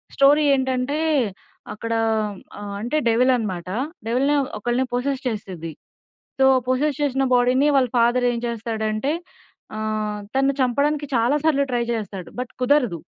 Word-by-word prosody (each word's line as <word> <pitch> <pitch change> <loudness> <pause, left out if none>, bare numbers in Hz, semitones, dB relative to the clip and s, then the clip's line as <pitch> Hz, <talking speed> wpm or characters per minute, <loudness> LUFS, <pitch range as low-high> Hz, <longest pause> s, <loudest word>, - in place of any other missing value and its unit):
Story 285 +2 +5
ఏంటంటే 260 +1 -1 0.8
అక్కడ 230 +2 -4 0.7
ఆహ్, 205 -1 -6
అంటే 245 +7 -1
డెవిల్ 245 +3 +4
అన్నమాట. 185 -6 -4 0.4
డెవిల్‌ని 265 +5 +2 0.2
ఒకల్ని 240 +4 0
పోసెస్ 260 +2 -1
చేస్తది. 190 -8 -5 0.7
సో 265 - +4 0.2
పోసెస్ 275 +3 0
చేసిన 270 -1 +1
బాడీ‌ని 250 +4 +3
వాళ్ళ 255 -2 +3
ఫాదర్ 245 +1 +3
ఏం 235 - -2
చేస్తాడంటే 220 +2 -2 0.6
ఆహ్, 215 -1 -2 0.2
తను 270 0 +2
చంపడానికి 290 +4 +1
చాలాసార్లు 280 +5 +2
ట్రై 240 -1 +1
చేస్తాడు. 200 -5 -6
బట్ 250 - -5
కుదరదు. 245 - +2
245 Hz, 125 wpm, -22 LUFS, 220-275 Hz, 0.8 s, Story